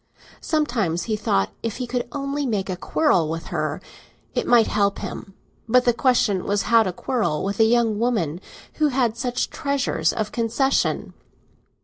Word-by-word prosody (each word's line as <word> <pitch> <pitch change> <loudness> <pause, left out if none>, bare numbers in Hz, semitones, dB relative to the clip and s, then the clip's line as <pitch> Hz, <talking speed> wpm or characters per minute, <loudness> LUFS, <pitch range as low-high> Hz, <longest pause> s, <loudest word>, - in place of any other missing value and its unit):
Sometimes 235 - 0
he 220 - -1
thought 95 - 0
that - - -31
if 220 - -5
he 250 - -3
could 245 0 -3
only 280 0 -2
make 200 -4 -1
a - - -2
quarrel 180 - +1
with 165 +1 -5
her - - -1 0.5
it - - -1
might 235 -2 +6
help 200 -1 +1
him; 195 - -7 0.3
but 250 +2 +4
the 240 - +4
question 225 -6 +2
was 205 0 0
how 230 -1 +5
to 190 -4 0
quarrel 180 - -1
with 200 +1 -3
a 225 - +6
young 225 -2 +2
woman 190 -9 0 0.4
who 305 - +3
had 250 -5 +1
such 245 +1 -2
treasures 275 - 0
of 215 -1 -3
concession. 240 +4 0
230 Hz, 170 wpm, -23 LUFS, 195-250 Hz, 0.5 s, might